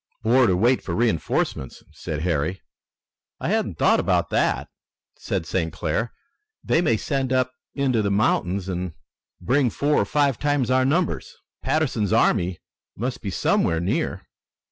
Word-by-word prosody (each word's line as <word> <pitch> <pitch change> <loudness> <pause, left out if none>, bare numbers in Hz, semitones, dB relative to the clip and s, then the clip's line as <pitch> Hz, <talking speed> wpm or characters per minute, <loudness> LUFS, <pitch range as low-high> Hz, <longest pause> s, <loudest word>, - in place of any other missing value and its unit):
"Or 120 +2 +4
to 90 -3 +2
wait 120 +6 +3
for - - -4
reinforcements," 85 - -1
said 75 -1 -5
Harry. 85 +2 -1 0.8
"I - - -2
hadn't - - 0
thought - - +4
of - - +1
that," - - +1 0.5
said - - -3
St. 85 -1 -1
Clair. 115 +9 -2 0.5
"They 165 - +2
may 135 -10 +2
send 135 +2 -2
up 130 0 +1 0.2
into 130 -5 +1
the 100 - 0
mountains 100 -2 +1
and 90 -2 -3 0.5
bring 130 +1 +2
four 145 +5 +1
or - - 0
five 140 +2 +1
times 145 -4 +1
our 130 0 +3
numbers. 165 +5 0 0.3
Patterson's 125 -10 0
army 95 -6 +2 0.4
must 125 +3 -3
be 100 - -4
somewhere 85 -3 +1
near." 85 +3 -1
115 Hz, 145 wpm, -23 LUFS, 90-130 Hz, 0.8 s, Or